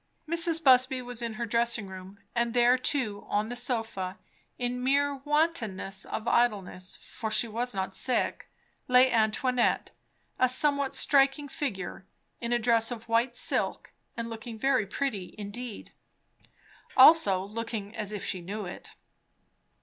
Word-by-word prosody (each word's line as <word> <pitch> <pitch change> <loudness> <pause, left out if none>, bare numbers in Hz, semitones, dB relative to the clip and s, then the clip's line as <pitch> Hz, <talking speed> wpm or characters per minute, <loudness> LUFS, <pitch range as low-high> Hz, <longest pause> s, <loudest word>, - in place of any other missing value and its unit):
Mrs. 335 0 +4
Busby 255 -1 +5
was 245 -1 -3
in 230 -2 -4
her 235 +2 -3
dressing 230 -1 0
room; 190 +1 -10 0.2
and 235 0 -1
there 245 +1 +5
too, 250 -5 -2
on 210 +2 0
the 245 - -4
sofa, 225 -6 -3 0.4
in 245 0 -3
mere 280 +2 +2
wantonness 265 - -1
of 220 - -5
idleness, 200 -7 0
for 220 - -6
she 215 +2 +2
was 235 +1 -3
not 190 0 -2
sick, 255 +4 -1 0.4
lay 255 +1 +5
Antoinette; 240 +2 +1 0.5
a 255 - +4
somewhat 280 +1 +1
striking 275 +1 +3
figure, 195 -9 -5 0.3
in 235 0 -4
a 240 - +3
dress 230 -1 +2
of 235 -2 -7
white 235 +2 +1
silk, - - -2 0.2
and 230 0 -3
looking 230 0 -7
very 260 -3 +1
pretty 210 -4 -3
indeed. 215 +2 -7 1.1
Also 255 - +7
looking 220 -1 -5
as 210 -2 -1
if 210 -2 -5
she 185 - -1
knew 200 +4 -5
it. 180 - -9
235 Hz, 140 wpm, -28 LUFS, 210-255 Hz, 1.1 s, Also